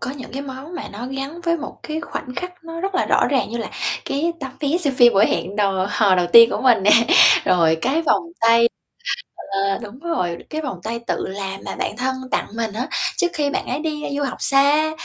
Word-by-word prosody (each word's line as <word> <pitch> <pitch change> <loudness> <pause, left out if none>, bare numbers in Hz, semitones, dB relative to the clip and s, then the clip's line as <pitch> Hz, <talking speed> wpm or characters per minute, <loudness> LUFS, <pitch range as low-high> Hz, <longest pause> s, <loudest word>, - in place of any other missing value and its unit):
có - - -3
những 270 -3 -9
cái 275 +1 -4
món 275 +5 -9
mà - - -5
nó 235 +5 -6
gắn 275 +5 -6
với 335 -1 0
một 295 - -8
cái 310 +1 -4
khoảnh 255 -6 -7
khắc 360 -1 -7
nó 330 0 -7
rất 390 0 -3
là - - +1
rõ - - +3
ràng 265 -5 0
như 235 - -4
là 230 - -5 0.3
cái 320 +5 -1
tấm 265 -1 -6
vé 300 +4 +1
xem 285 -6 -1
phim 240 -1 +6
buổi 205 +3 +5
hẹn 195 +3 -2
đò 195 -2 +1
hò 205 -4 +3
đầu 180 -1 +2
tiên 230 0 +9
của - - -2
mình 240 -6 +4
nè. 210 - +4 0.5
Rồi 165 -3 +3
cái 295 +6 +1
vòng 325 - +2 0.2
tay 230 +1 +5 0.8
ờ, 195 0 0
đúng 220 +5 -10
rồi, 185 - -2
cái 310 0 -3
vòng 255 - -5
tay 230 +2 -3
tự - - -2
làm 195 0 -5
mà - - -5
bạn 210 - -3
thân 260 +1 -1 0.2
tặng - - 0
mình 225 -2 -2
á, 245 +5 -3 0.3
trước 355 - +2
khi 290 -1 0
bạn - - -2
ấy 260 +4 -2
đi 305 -1 -4
du 290 - -1
học 275 - -3
xa. 285 +3 +3
260 Hz, 235 wpm, -21 LUFS, 215-305 Hz, 0.8 s, tiên